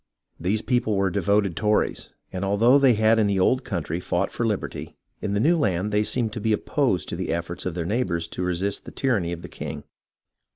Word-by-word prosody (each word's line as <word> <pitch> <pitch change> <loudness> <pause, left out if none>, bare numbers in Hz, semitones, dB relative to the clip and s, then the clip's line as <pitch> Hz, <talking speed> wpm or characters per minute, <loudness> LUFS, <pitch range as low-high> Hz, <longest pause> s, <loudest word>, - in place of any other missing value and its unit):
These 100 +6 0
people 115 -2 +1
were 95 -1 +1
devoted 100 -1 +1
Tories, 105 +3 0 0.2
and 95 +1 -3
although 115 +8 +4
they 135 -4 +5
had 110 +1 +4
in 105 - +3
the 100 -1 +1
old 130 +7 +3
country 85 -4 -3
fought 90 +1 -1
for 120 - -1
liberty, 105 -3 -4 0.3
in 100 - -2
the 100 - +1
new 160 +10 +4
land 100 - 0
they 105 +1 +2
seemed 110 -1 -2
to 110 - -4
be 110 0 +2
opposed 120 - 0
to - - -3
the 90 +1 -3
efforts 85 +2 -3
of 90 - -4
their 85 -2 -2
neighbours 85 -5 -1
to - - -5
resist 90 +3 -1
the - - -8
tyranny 105 -11 0
of 85 -1 -6
the - - -6
king. - - -7
100 Hz, 215 wpm, -24 LUFS, 90-110 Hz, 0.3 s, they